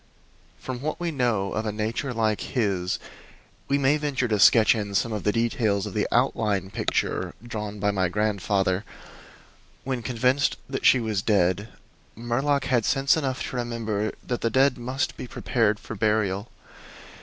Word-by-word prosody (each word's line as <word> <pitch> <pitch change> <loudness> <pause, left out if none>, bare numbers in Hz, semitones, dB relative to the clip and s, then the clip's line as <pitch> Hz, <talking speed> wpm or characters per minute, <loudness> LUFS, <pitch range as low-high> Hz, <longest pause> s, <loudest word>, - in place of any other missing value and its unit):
From 125 -1 -6
what 155 +2 -3
we 175 -1 -1
know 120 -9 0
of 110 0 -2
a - - 0
nature 110 +6 -2
like 110 -3 0
his 100 -8 -1 0.7
we 140 - +2
may 140 +2 +3
venture 145 -4 -1
to 105 -2 +1
sketch 110 +3 +7
in 100 -2 -4
some 115 +3 +1
of 105 - -3
the 105 - +4
details 110 -3 0
of 105 - -6
the - - 0
outline 100 -3 +1
picture - - -1
drawn 105 -3 -5
by 105 +1 +1
my 95 -3 0
grandfather. 100 -1 0 1.0
When 130 -2 -2
convinced 125 +3 +1
that 135 0 0
she 130 - +6
was 110 -4 -1
dead, 100 0 +1 0.5
Murlock 135 +5 0
had 120 -4 +2
sense 135 +3 +3
enough 135 -5 -2
to 125 - -5
remember 110 -3 -2
that 120 - -3
the 115 - +1
dead 130 +3 +3
must 130 +2 -3
be - - -6
prepared 110 -4 0
for - - -8
burial. 105 -1 0
115 Hz, 165 wpm, -25 LUFS, 105-130 Hz, 1.0 s, sketch